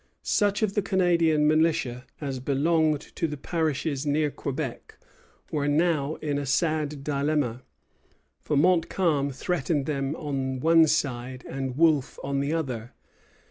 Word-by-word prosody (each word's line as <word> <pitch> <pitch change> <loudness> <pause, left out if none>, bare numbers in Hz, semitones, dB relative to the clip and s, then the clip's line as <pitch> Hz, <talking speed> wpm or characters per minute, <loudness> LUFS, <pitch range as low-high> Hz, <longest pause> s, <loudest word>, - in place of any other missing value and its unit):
Such 205 0 +1
of 205 -2 +1
the 205 - +1
Canadian 170 -6 +2
militia 155 -6 +1
as 135 -3 -4
belonged 150 +3 +1
to 165 - 0
the 150 -1 -5
parishes 155 -2 -1
near 150 0 +1
Quebec 135 -2 -5 0.5
were 145 -2 0
now 155 -1 +1
in 145 -2 -1
a 145 - -3
sad 150 -1 0
dilemma; 140 -4 0 0.8
for 150 - -1
Montcalm 165 -3 +2
threatened 145 +1 -1
them 140 -1 -2
on 135 -4 -3
one 165 +2 +5
side, 130 -4 -2
and 135 -1 -4
Wolfe 155 -5 +3
on 140 0 -1
the 140 +2 -1
other. 125 -8 -3
150 Hz, 135 wpm, -26 LUFS, 135-160 Hz, 0.8 s, one